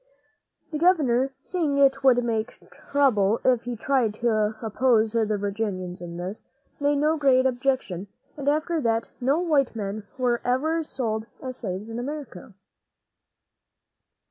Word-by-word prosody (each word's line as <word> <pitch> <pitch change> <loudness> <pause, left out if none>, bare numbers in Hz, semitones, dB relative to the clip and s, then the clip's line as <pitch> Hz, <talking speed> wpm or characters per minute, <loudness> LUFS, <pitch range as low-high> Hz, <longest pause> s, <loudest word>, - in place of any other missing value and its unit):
The 305 - -3
governor, 275 -7 +3
seeing 315 -6 -1
it 275 -1 +4
would 245 -2 +5
make 230 0 -2
trouble 230 -7 +2
if 250 -2 +3
he 245 0 -3
tried 235 -2 +1
to 215 -2 +1
oppose 225 -1 +2
the 215 -2 +1
Virginians 195 -3 -3
in 170 -1 -7
this, 185 +4 -5 0.4
made 290 0 +2
no 305 +3 +2
great 265 -3 +4
objection, 250 -8 -1 0.3
and 285 -1 -1
after 310 +2 0
that 225 -2 +1 0.2
no 270 +5 +2
white 300 -8 +1
men 205 -1 -4
were 245 -2 +1
ever 305 +7 +1
sold 225 -7 -3
as 255 -1 -6
slaves 195 -1 -5
in 230 +1 -5
America. 250 -8 -7
245 Hz, 140 wpm, -25 LUFS, 215-280 Hz, 0.4 s, would